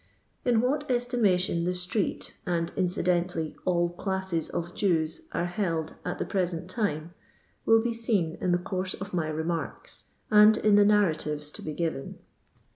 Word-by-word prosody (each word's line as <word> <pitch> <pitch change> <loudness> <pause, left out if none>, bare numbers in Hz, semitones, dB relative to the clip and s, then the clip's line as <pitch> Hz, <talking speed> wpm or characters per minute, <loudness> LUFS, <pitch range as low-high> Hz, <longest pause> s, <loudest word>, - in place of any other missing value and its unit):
In 240 -3 +3
what 285 +4 -1
estimation 220 -9 +2
the 180 +1 0
street, 180 +3 -1
and, 170 -1 0
incidentally, 175 -3 0
all 175 -1 +2
classes 190 -2 -2
of 170 +1 -4
Jews 165 - 0
are - - -1
held 170 -4 -2
at - - -3
the - - -2
present 180 -3 -1
time, 170 -7 -2 0.5
will 225 0 +5
be 240 -1 0
seen 210 -8 0
in 180 - +1
the 175 - +4
course 185 +1 -3
of 195 0 -8
my 165 -3 0
remarks; 160 +2 -4 0.3
and 210 +1 +7
in 210 -1 +4
the 205 0 +6
narratives 155 -8 +1
to - - -7
be 155 - -5
given. 160 -4 -3
180 Hz, 155 wpm, -28 LUFS, 165-205 Hz, 0.5 s, and